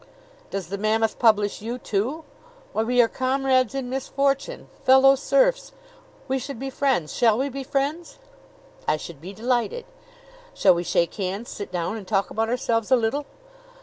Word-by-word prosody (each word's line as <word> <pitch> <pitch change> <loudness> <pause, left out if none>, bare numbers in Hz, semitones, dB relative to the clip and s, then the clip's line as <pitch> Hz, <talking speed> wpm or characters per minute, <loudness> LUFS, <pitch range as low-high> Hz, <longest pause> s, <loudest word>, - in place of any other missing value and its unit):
"Does 190 -4 -5
the 200 +1 -4
Mammoth 220 +1 +1
publish 210 -3 +3
you, 235 +3 -4
too? 250 +8 -2 0.5
Why, - - +1
we 245 +2 +4
are - - +2
comrades 260 0 +1
in 270 -2 -3
misfortune 275 - -1 0.2
fellow 265 +1 +7
serfs! - - +1 0.5
We 265 0 0
should 275 0 -6
be 270 +3 -5
friends. 260 - 0
Shall 225 -3 +3
we 270 +3 0
be 275 +1 -5
friends?" 285 +5 -2 0.7
"I - - +2
should 155 -2 -10
be 180 +4 -8
delighted." 245 - -1 0.7
"Shall 190 - +5
we 170 - -1
shake 170 0 0
hands, 200 +4 -4
sit 205 - -7
down, 180 +4 -2
and 200 -4 -10
talk 195 -1 0
about 225 +1 -1
ourselves 230 -3 0
a 260 - +6
little?" 255 +5 -1
245 Hz, 165 wpm, -24 LUFS, 210-270 Hz, 0.7 s, fellow